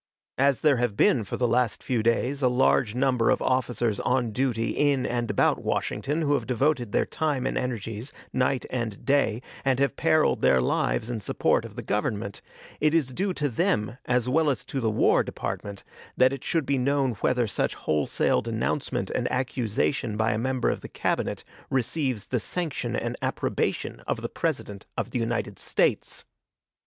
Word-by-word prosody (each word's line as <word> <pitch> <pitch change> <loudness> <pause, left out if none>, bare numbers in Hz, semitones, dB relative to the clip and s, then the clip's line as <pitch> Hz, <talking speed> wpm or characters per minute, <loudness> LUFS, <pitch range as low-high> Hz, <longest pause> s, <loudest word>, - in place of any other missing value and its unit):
As 140 -1 +3
there 145 -4 +4
have 120 -4 0
been 120 - +4
for 100 - -5
the 125 - +2
last 120 -2 +1
few 120 -3 0
days 120 +5 +1
a 130 - +4
large 125 -3 +2
number 125 -3 +2
of - - +3
officers 120 -4 0
on 125 -2 +1
duty 115 -1 0
in 140 -3 +2
and 120 -1 -1
about - - +2
Washington 150 +4 -1
who 145 -1 +2
have 145 - 0
devoted 125 -2 +1
their - - +2
time 145 -5 -1
and - - -1
energies, 115 0 -3 0.2
night 130 0 +1
and 120 -5 -3
day, 135 -4 +2 0.2
and 135 -2 +2
have 140 +1 +1
periled 155 -1 +2
their 65 - +5
lives 110 - 0
in 120 - -2
the - - -12
support - - +1
of - - -10
the - - -6
Government, 105 -1 -2 0.4
it 155 +2 +3
is 150 -6 +2
due 195 +7 0
to 150 - 0
them, 110 -1 0
as 125 -1 +1
well 155 +4 +3
as 135 - -1
to 135 - -3
the 115 -3 +1
War 110 - +3
Department, 100 -1 -5 0.3
that 130 +1 +5
it 135 0 -6
should 160 -3 0
be 140 -1 +1
known 135 0 +2
whether 125 -1 +2
such 105 - -1
wholesale 75 -1 +1
denouncement - - -2
and - - -1
accusation 125 -2 -1
by 110 +1 +2
a 105 - 0
member 130 +1 +1
of - - -4
the - - -8
Cabinet - - -1 0.3
receives 130 -3 -1
the 125 - +1
sanction 165 +6 -3
and - - -2
approbation - - -1
of - - -2
the - - -2
President 100 -2 -3
of - - -2
the 125 - -1
United 115 0 -2
States. - - 0
125 Hz, 185 wpm, -26 LUFS, 115-135 Hz, 0.4 s, their